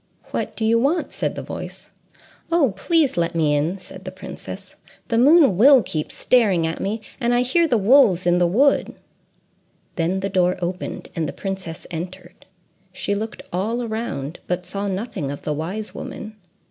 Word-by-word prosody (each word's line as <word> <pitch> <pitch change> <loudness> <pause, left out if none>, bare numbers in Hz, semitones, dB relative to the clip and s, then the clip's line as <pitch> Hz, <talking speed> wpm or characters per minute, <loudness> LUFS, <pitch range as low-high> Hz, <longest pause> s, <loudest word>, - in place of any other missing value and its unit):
"What - - -3
do 220 - -1
you 230 +1 +4
want?" 295 +8 0
said - - -2
the - - -5
voice. - - -8 0.6
"Oh, 295 - +3
please, 305 - +2
let 170 0 0
me 155 -3 +2
in!" 160 +6 0
said 190 0 -11
the 185 - -5
princess. 185 - -9 0.3
"The 230 - +2
moon 280 - +6
will 260 +2 +7
keep 155 -1 -3
staring 205 -10 +3
at 165 0 -3
me; 215 +3 -2 0.2
and 240 -1 +2
I 245 - +3
hear 330 +7 +3
the 245 - +2
wolves 210 -4 +5
in 175 0 +3
the 175 - +4
wood." 270 +11 +2 1.0
Then 180 +3 0
the 195 - -1
door 185 -2 +2
opened, 180 +1 -4
and 160 -3 -1
the - - -6
princess 190 -4 -5
entered. 180 +2 -8 0.4
She 200 - -2
looked 215 +2 -4
all 220 +7 -1
around, 220 - -4
but 180 0 -2
saw 200 0 -3
nothing 195 - -3
of 140 - -6
the 150 - -1
wise 185 +8 -4
woman. 215 0 -7
195 Hz, 175 wpm, -22 LUFS, 175-235 Hz, 1.0 s, will